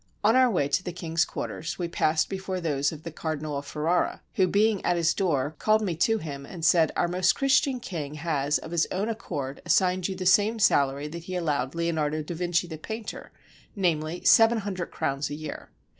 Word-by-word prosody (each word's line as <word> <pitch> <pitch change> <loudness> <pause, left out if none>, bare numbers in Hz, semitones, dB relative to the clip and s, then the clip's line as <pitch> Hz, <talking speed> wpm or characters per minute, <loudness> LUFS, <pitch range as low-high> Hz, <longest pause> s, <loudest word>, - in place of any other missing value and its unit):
On 220 +3 +4
our 255 -1 +5
way 175 -10 +1
to 165 - 0
the 180 - -4
king's 170 -1 0
quarters, 160 +1 -5
we 175 - -2
passed 155 -2 +1
before 190 -1 -4
those 145 -4 0
of 155 -1 -10
the 165 - -6
Cardinal 155 -2 -4
of 140 0 -6
Ferrara, 165 +4 0
who 185 - +3
being 205 +1 +2
at 175 - +1
his 170 0 +2
door 155 -5 0
called 215 0 +3
me 180 -5 -1
to 225 +7 +2
him 145 -7 -6
and 165 +3 -6
said, 165 -4 +4
" - - -30
Our 175 - +2
most 180 +1 +2
Christian 270 -1 +2
King 155 -10 -5
has 150 -2 0
of 160 - -9
his 170 -1 +1
own 200 +4 -1
accord 145 -11 -5
assigned 180 +1 +2
you 190 - -4
the 185 0 -5
same 205 +4 +4
salary 140 -7 +2
that 170 +2 -8
he 185 - -5
allowed 145 -5 -1
Leonardo 155 -2 -1
da 165 - -6
Vinci 175 0 0
the 160 -3 -8
painter, 220 +5 -7 0.4
namely, 170 -3 -1
seven 225 +1 +6
hundred 190 -3 -4
crowns 140 +1 -2
a 145 - -4
year. 155 -1 -7
170 Hz, 210 wpm, -26 LUFS, 155-190 Hz, 0.4 s, seven